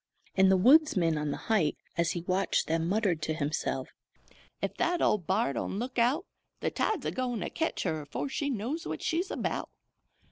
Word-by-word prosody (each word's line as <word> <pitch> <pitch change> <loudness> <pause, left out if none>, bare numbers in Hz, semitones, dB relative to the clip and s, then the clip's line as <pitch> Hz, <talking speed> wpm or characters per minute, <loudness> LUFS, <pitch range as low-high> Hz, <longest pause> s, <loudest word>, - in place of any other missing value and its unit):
And 190 0 +5
the 190 - +5
woodsman 205 - +5
on 150 0 -1
the - - -2
height, 200 -9 +2 0.2
as 170 0 +1
he 175 - -3
watched 185 +3 +1
them, 165 +1 0
muttered 195 -5 +1
to 155 0 -1
himself: 145 -3 -2 0.7
"Ef - - -2
that 355 0 +1
old 200 - +2
b'ar 190 -6 +2
don't 195 - -3
look 245 +3 -2
out, 265 - +2 0.3
the - - -1
tide's 430 -10 -1
a - - 0
goin' 245 -4 -2
to - - -3
ketch 325 0 -1
her 155 -1 -1
afore 145 - -4
she 285 +1 -2
knows 260 +7 -3
what - - -4
she's 345 +3 0
about! - - -2
195 Hz, 190 wpm, -30 LUFS, 165-260 Hz, 0.7 s, And